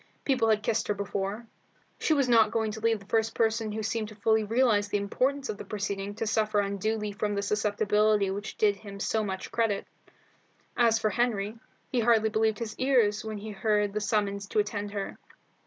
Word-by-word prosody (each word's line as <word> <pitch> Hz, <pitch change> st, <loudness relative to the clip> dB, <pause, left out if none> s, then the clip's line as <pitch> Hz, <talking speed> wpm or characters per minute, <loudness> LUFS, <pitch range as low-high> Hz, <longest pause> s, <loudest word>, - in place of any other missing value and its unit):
People 255 Hz, -5 st, +2 dB
had 215 Hz, -1 st, +2 dB
kissed 220 Hz, -, 0 dB
her 210 Hz, -, 0 dB
before. 200 Hz, +2 st, -3 dB, 0.5 s
She 315 Hz, -, +2 dB
was 275 Hz, -3 st, +2 dB
not 225 Hz, -3 st, +5 dB
going 220 Hz, 0 st, -1 dB
to 220 Hz, -, -6 dB
leave 225 Hz, 0 st, +1 dB
the 200 Hz, -, -15 dB
first 225 Hz, +2 st, 0 dB
person 225 Hz, -1 st, +1 dB
who 210 Hz, -, -5 dB
had 220 Hz, -, -2 dB
seemed 220 Hz, 0 st, -1 dB
to 215 Hz, -, -11 dB
fully 220 Hz, +1 st, +2 dB
realize 220 Hz, -2 st, +2 dB
the 205 Hz, -, 0 dB
importance 265 Hz, +7 st, 0 dB
of 210 Hz, -, -5 dB
the -, -, -5 dB
proceeding 200 Hz, -1 st, -4 dB
to 225 Hz, -, -3 dB
suffer 215 Hz, -1 st, +1 dB
unduly 210 Hz, +2 st, -1 dB
from 205 Hz, 0 st, -2 dB
a 200 Hz, -, -1 dB
susceptibility 210 Hz, 0 st, +2 dB
which 205 Hz, +2 st, -5 dB
did 205 Hz, -2 st, +3 dB
him 200 Hz, -1 st, -10 dB
so 220 Hz, +1 st, 0 dB
much 190 Hz, -2 st, -5 dB
credit. 220 Hz, -4 st, 0 dB, 0.9 s
As 230 Hz, -2 st, +4 dB
for 215 Hz, -1 st, 0 dB
Henry, 225 Hz, -3 st, -1 dB, 0.3 s
he 250 Hz, -, +1 dB
hardly 225 Hz, -1 st, +4 dB
believed 220 Hz, 0 st, +1 dB
his 220 Hz, -1 st, -5 dB
ears 235 Hz, -6 st, +3 dB
when 220 Hz, -1 st, -5 dB
he 215 Hz, +1 st, -7 dB
heard 210 Hz, 0 st, +1 dB
the 215 Hz, -, -1 dB
summons 200 Hz, -1 st, -1 dB
to -, -, -4 dB
attend 205 Hz, 0 st, 0 dB
her. 200 Hz, -1 st, -5 dB
215 Hz, 205 wpm, -28 LUFS, 205-225 Hz, 0.9 s, not